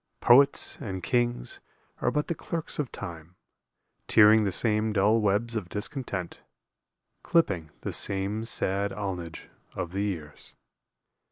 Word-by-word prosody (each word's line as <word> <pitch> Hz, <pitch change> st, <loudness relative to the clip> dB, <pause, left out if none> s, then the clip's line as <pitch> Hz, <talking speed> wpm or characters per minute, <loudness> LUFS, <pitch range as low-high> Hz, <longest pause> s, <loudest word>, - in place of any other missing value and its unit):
Poets 140 Hz, +4 st, +5 dB
and 95 Hz, -4 st, -5 dB
kings 120 Hz, -, -1 dB, 0.4 s
are -, -, +2 dB
but 150 Hz, 0 st, 0 dB
the -, -, -2 dB
clerks 165 Hz, -1 st, -5 dB
of 145 Hz, -4 st, -2 dB
Time, 85 Hz, 0 st, -8 dB, 0.7 s
Tiering 110 Hz, 0 st, +6 dB
the 100 Hz, -, 0 dB
same 110 Hz, +2 st, 0 dB
dull 105 Hz, +3 st, +3 dB
webs 105 Hz, +3 st, +1 dB
of 100 Hz, -6 st, -3 dB
discontent, 105 Hz, -3 st, -5 dB, 0.8 s
Clipping 95 Hz, -, +1 dB
the -, -, -4 dB
same 100 Hz, +3 st, -1 dB
sad 100 Hz, -2 st, 0 dB
alnage 90 Hz, -5 st, -5 dB, 0.3 s
of 85 Hz, -, -4 dB
the 95 Hz, +2 st, -2 dB
years. 85 Hz, -8 st, -5 dB
105 Hz, 125 wpm, -27 LUFS, 95-115 Hz, 0.8 s, Tiering